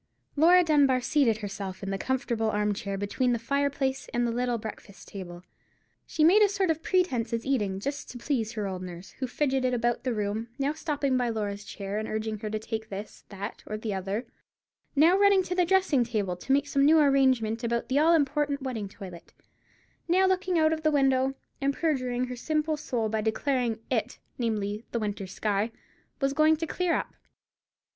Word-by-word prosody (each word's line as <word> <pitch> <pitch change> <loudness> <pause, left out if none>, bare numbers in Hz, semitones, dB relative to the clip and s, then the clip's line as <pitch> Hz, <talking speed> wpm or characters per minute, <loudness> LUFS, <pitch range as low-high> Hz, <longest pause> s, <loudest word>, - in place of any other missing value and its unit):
Laura 350 +4 +6
Dunbar 285 -5 +4
seated 250 -3 +2
herself 195 -2 -6
in 195 - -3
the 195 - -1
comfortable 235 -3 -1
arm 210 -1 +1
chair 200 -1 -4
between 240 +5 0
the - - +1
fireplace 275 +2 -1
and 240 -1 +1
the 235 - 0
little 245 0 0
breakfast 215 -2 -9
table. 175 -3 -8 0.6
She 310 - 0
made 370 +7 +6
a 415 - +6
sort 385 -3 +1
of 320 0 -3
pretence 295 -13 0
at 230 0 -2
eating, 205 -8 0
just 280 +7 -4
to 245 - -8
please 235 -3 -2
her 215 -2 -3
old 190 -2 -4
nurse, 180 0 -8
who 260 - -1
fidgeted 260 -1 0
about 240 0 0
the 255 - 0
room; 210 +2 -2
now 280 +2 0
stopping 285 -4 -1
by 245 -1 +1
Laura's 205 -2 -3
chair, 200 +1 -5
and 220 - -4
urging 215 0 -3
her 215 - -4
to 215 - -2
take 220 0 -5
this, 200 +2 -8
that, 200 +1 -6
or 215 - -3
the 215 -1 -3
other; 195 +5 -3 0.7
now 320 +6 +6
running 400 -2 +5
to 360 - -3
the 360 -1 +2
dressing 360 -8 +3
table 210 -6 -2
to 180 - -5
make 280 +1 +4
some 280 -1 +1
new 310 +3 +6
arrangement 260 -6 +3
about 235 0 -1
the 270 +2 +2
all 330 +2 +5
important 290 -1 0
wedding 225 -7 -4
toilet; 185 -4 -11 0.7
now 370 +3 +4
looking 370 -1 +1
out 315 0 +4
of 315 - -3
the 310 - +3
window 270 -2 +2 0.3
and 275 0 +1
perjuring 255 -6 0
her 250 0 -6
simple 305 +4 -1
soul 240 -6 -2
by 215 0 -1
declaring 240 +2 0 0.2
that 225 -4 +2
"it"—namely, 215 -3 -4
the 235 - 0
winter 205 -2 -3
sky—was 220 +7 -3
going 310 +2 +4
to 325 - -2
clear 355 +2 0
up. - - -3
250 Hz, 195 wpm, -28 LUFS, 215-290 Hz, 0.7 s, Laura